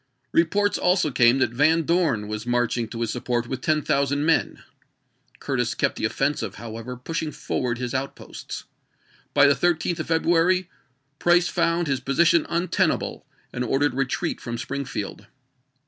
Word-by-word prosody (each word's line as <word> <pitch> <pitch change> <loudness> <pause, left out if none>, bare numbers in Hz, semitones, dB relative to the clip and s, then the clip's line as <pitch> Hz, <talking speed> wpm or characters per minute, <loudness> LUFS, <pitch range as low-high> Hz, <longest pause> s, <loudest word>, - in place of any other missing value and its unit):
Re 165 - +5
ports 205 +4 0
also 180 -4 +2
came 120 0 +4
that 130 -4 +1
Van 155 +6 +3
Dorn 155 - +1
was 105 +2 -5
marching 120 -1 0
to 115 +1 -6
his 115 -1 -1
support 120 -1 -2
with 130 +2 -5
ten 155 -2 +1
thousand 140 +1 +1
men. 165 0 +1 0.7
Curtis - - -1
kept - - 0
the - - -2
offensive, 135 -7 -1
however, 115 +3 -7
pushing 155 +4 -3
forward 125 -4 -2
his 125 0 -4
out 135 +1 -2
posts. - - -8 0.7
By 145 0 +7
the 140 - +6
13th 175 +1 0
of 155 - -4
February 170 +2 +2 0.5
Price 175 0 +4
found 170 +1 +1
his 135 -3 0
position 165 +5 +3
untenable 170 +2 0 0.3
and 125 - -2
ordered 135 +2 +1
a - - -9
retreat 135 -2 -1
from 120 -1 -4
Springfield. 135 -5 -5
140 Hz, 160 wpm, -24 LUFS, 120-165 Hz, 0.7 s, By